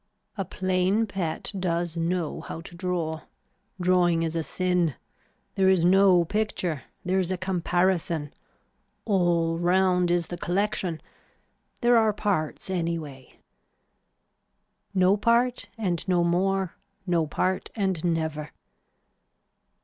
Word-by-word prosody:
A 195 Hz, -, -2 dB
plain 185 Hz, +4 st, +1 dB
pet 185 Hz, -2 st, -3 dB
does 170 Hz, -2 st, -1 dB
know 170 Hz, -1 st, -1 dB
how 165 Hz, -, -7 dB
to 170 Hz, -, -10 dB
draw. 170 Hz, -3 st, -2 dB, 0.6 s
Drawing 175 Hz, -2 st, +3 dB
is 165 Hz, 0 st, -2 dB
a 165 Hz, -, +1 dB
sin. 180 Hz, -3 st, 0 dB, 0.6 s
There 190 Hz, -1 st, +3 dB
is 185 Hz, -3 st, +4 dB
no 185 Hz, -1 st, +5 dB
picture. 180 Hz, -, -2 dB, 0.2 s
There 185 Hz, +1 st, +1 dB
is 185 Hz, -1 st, -1 dB
a 185 Hz, -, -1 dB
comparison. 175 Hz, -4 st, 0 dB, 0.7 s
All 170 Hz, -5 st, +2 dB
round 180 Hz, 0 st, +3 dB
is 175 Hz, -1 st, +2 dB
the 175 Hz, +1 st, -7 dB
collection. 190 Hz, -2 st, -1 dB, 0.8 s
There 240 Hz, -1 st, +5 dB
are 220 Hz, -2 st, +3 dB
parts 195 Hz, -7 st, -2 dB
anyway. 165 Hz, -7 st, -4 dB, 1.6 s
No 185 Hz, +2 st, +4 dB
part 235 Hz, +3 st, +1 dB
and 180 Hz, -6 st, -1 dB
no 180 Hz, -2 st, +3 dB
more, 190 Hz, +1 st, +1 dB, 0.3 s
no 170 Hz, -4 st, +1 dB
part 185 Hz, +5 st, -1 dB
and 190 Hz, -6 st, -1 dB
never. 160 Hz, -3 st, -1 dB
180 Hz, 115 wpm, -26 LUFS, 165-190 Hz, 1.6 s, no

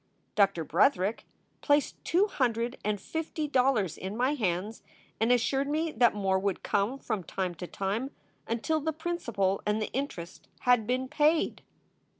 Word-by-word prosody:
Doctor 195 Hz, -5 st, +2 dB
Bretherick 220 Hz, -, +2 dB, 0.4 s
placed 290 Hz, -1 st, +1 dB
two 365 Hz, +4 st, +3 dB
hundred 240 Hz, -, 0 dB
and 210 Hz, 0 st, 0 dB
fifty 315 Hz, +5 st, -3 dB
dollars 250 Hz, -, +2 dB
in 195 Hz, +3 st, -5 dB
my 255 Hz, +4 st, +2 dB
hands 210 Hz, -3 st, -2 dB, 0.4 s
and 225 Hz, +2 st, +3 dB
assured 270 Hz, +3 st, +2 dB
me 315 Hz, +2 st, 0 dB
that 240 Hz, -4 st, +3 dB
more 190 Hz, -2 st, +1 dB
would 195 Hz, -1 st, -2 dB
come 205 Hz, +6 st, 0 dB
from 215 Hz, -7 st, -3 dB
time 180 Hz, +1 st, -3 dB
to 175 Hz, +1 st, -7 dB
time 205 Hz, +9 st, -2 dB, 0.4 s
until 235 Hz, +8 st, 0 dB
the 315 Hz, +1 st, -2 dB
principal 235 Hz, -, -1 dB
and 210 Hz, +1 st, 0 dB
the 215 Hz, -, -3 dB
interest 210 Hz, -11 st, -5 dB
had 245 Hz, -4 st, +3 dB
been 255 Hz, +1 st, 0 dB
paid. 305 Hz, +3 st, +2 dB
235 Hz, 155 wpm, -29 LUFS, 200-285 Hz, 0.4 s, two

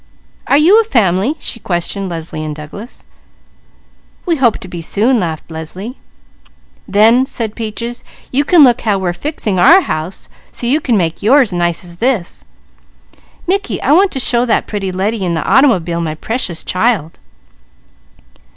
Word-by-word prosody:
Are 280 Hz, -, +4 dB
you 370 Hz, +9 st, +6 dB
a -, -, -2 dB
fam'ly?" 220 Hz, -, +1 dB
she 245 Hz, -, -6 dB
questioned 190 Hz, +1 st, -3 dB
Leslie 160 Hz, -2 st, -5 dB
and 155 Hz, -1 st, -5 dB
Douglas. 160 Hz, -, -10 dB, 1.2 s
"We 340 Hz, -3 st, +1 dB
hope 245 Hz, -5 st, +2 dB
to -, -, -9 dB
be 175 Hz, -2 st, -7 dB
soon," 225 Hz, +9 st, +1 dB
laughed 165 Hz, -3 st, -4 dB
Leslie. 180 Hz, -, -7 dB, 0.9 s
"Then," 225 Hz, +6 st, +4 dB
said 225 Hz, -5 st, -4 dB
Peaches, 230 Hz, +2 st, -5 dB, 0.3 s
"you 275 Hz, +3 st, +2 dB
can 320 Hz, +1 st, +6 dB
look 245 Hz, -3 st, +4 dB
how 210 Hz, -3 st, +1 dB
we're 185 Hz, -2 st, -2 dB
fixing 215 Hz, -, -3 dB
our 330 Hz, -, +7 dB
house 155 Hz, -, -4 dB, 0.2 s
so -, -, -6 dB
you 280 Hz, +6 st, +2 dB
can 240 Hz, -6 st, +1 dB
make 165 Hz, -3 st, -1 dB
yours 240 Hz, 0 st, +4 dB
nice 175 Hz, 0 st, -1 dB
as 175 Hz, -1 st, -8 dB
this. 230 Hz, -5 st, -1 dB, 1.0 s
Mickey, 395 Hz, +3 st, -1 dB
I -, -, +2 dB
want 375 Hz, +6 st, +5 dB
to 270 Hz, -, -3 dB
show 240 Hz, -1 st, +2 dB
that 235 Hz, -3 st, +1 dB
pretty 195 Hz, -3 st, -4 dB
lady 195 Hz, +3 st, -2 dB
in 175 Hz, -2 st, -1 dB
the 160 Hz, -, -3 dB
auto'bile 180 Hz, -, +3 dB
my 155 Hz, -2 st, -3 dB
Precious 185 Hz, -2 st, -3 dB
Child." 185 Hz, -5 st, -1 dB
210 Hz, 160 wpm, -15 LUFS, 175-255 Hz, 1.2 s, our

